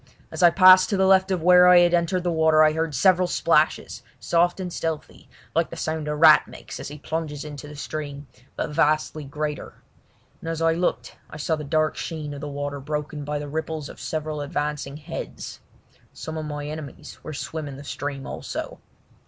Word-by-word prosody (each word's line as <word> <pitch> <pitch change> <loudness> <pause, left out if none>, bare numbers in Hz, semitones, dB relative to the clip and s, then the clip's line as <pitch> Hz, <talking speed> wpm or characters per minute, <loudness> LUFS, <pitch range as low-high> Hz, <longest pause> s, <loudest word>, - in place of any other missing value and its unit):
As - - -5
I 175 - +8
passed 185 +1 +7
to 200 - 0
the 190 - +3
left 190 0 +4
of 185 -4 -1
where 180 0 +7
I 180 0 +8
had 175 0 +3
entered 175 +1 +1
the 175 - 0
water 160 -1 +4
I 155 0 +4
heard 160 -2 -2
several 185 +5 +4
splashes, 160 -3 +1 0.2
soft 175 +2 +1
and 180 -2 -5
stealthy, 160 -2 -5 0.2
like 165 0 +1
the - - -8
sound 155 -1 -3
a 150 - -1
rat 155 +1 +6
makes - - -10
as - - -6
he 145 +1 -8
plunges 150 -1 -4
into 150 -1 -8
the 150 - -10
stream, 145 -1 -6 0.3
but - - -3
vastly 155 0 +1
greater; 150 +1 -5 0.6
and 165 - -6
as 165 -1 -3
I 165 0 +3
looked 175 +2 -2
I - - -9
saw 160 +2 0
the 155 - -6
dark 155 +2 0
sheen 155 -3 -5
of 140 - -8
the 150 - -5
water 145 0 -4
broken 150 +1 -4
by 150 +1 -3
the 145 0 -5
ripples 155 0 -4
of - - -12
several 155 -1 -4
advancing 145 -1 -3
heads. 155 +2 -7 0.5
Some 160 - -7
of 155 -1 -4
my 145 -1 -5
enemies 150 -2 -8
were - - -6
swimming 145 -2 -6
the 140 - -10
stream 140 0 -5
also. - - -6
155 Hz, 200 wpm, -24 LUFS, 145-165 Hz, 0.6 s, I